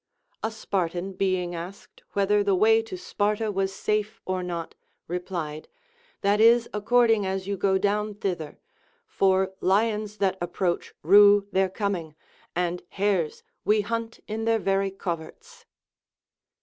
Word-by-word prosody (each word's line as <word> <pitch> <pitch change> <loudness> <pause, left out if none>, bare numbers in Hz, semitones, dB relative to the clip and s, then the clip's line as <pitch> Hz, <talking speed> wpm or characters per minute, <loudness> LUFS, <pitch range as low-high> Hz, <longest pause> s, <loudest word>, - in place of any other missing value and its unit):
A 220 - -1
Spartan 190 -4 -3
being 185 -2 0
asked 175 +4 -9
whether 205 +1 +2
the 200 -1 +2
way 220 +4 +5
to 225 -4 -7
Sparta 210 +3 -1
was 195 -1 -1
safe 210 +2 -2
or 185 0 -1
not, 170 -2 -5 0.3
replied: 170 -3 -4 0.5
That 205 +2 +2
is 235 +1 +6
according 225 -1 +3
as 190 0 -2
you 200 +1 -2
go 190 0 +2
down 210 +1 0
thither; 180 -7 -4 0.5
for 190 - +1
lions 210 +2 +1
that 190 -2 0
ap 175 0 -4
proach 175 -2 -1
rue 200 +3 +7
their 190 -1 +2
coming, 185 -6 -3 0.4
and 175 0 -1
hares 195 -6 -1 0.2
Λνβ 210 0 +4
hunt 230 +1 -4
in 220 +1 -3
their 225 0 +3
very 195 -1 +1
coverts. 195 - -7
195 Hz, 135 wpm, -26 LUFS, 185-210 Hz, 0.5 s, rue